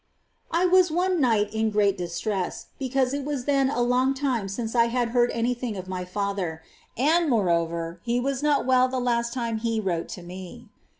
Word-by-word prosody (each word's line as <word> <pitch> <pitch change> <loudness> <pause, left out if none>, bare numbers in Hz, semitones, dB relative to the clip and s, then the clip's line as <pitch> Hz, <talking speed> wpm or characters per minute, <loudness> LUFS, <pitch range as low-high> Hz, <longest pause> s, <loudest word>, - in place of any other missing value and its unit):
23. 345 +3 +2
I 360 - -1
was 365 -1 +6
one 355 +1 +1
night 220 -5 +2
in 220 0 +1
great 205 -2 +2
distress, 180 +2 -3
because 265 -1 0
it 285 0 -2
was 280 -3 -3
then 275 -2 +2
a 245 -3 0
long 255 +2 +2
time 255 -8 -1
since 225 +3 -4
I 235 -1 +4
had 240 0 0
heard 240 0 +3
any 235 +2 0
thing 240 -4 -4
of 185 0 -7
my 185 -1 -4
father 180 -4 -3 0.3
^ - - -11
and, 320 +4 +3
moreover, 170 -6 0
he 240 +1 0
was 270 +1 -1
not 295 -1 +2
well 255 0 +4
the 260 0 -3
last 235 -1 0
time 235 -3 -2
he 230 0 -1
wrote 175 -5 -2
to 180 - -10
me. 185 +6 -10
235 Hz, 205 wpm, -25 LUFS, 200-265 Hz, 0.3 s, was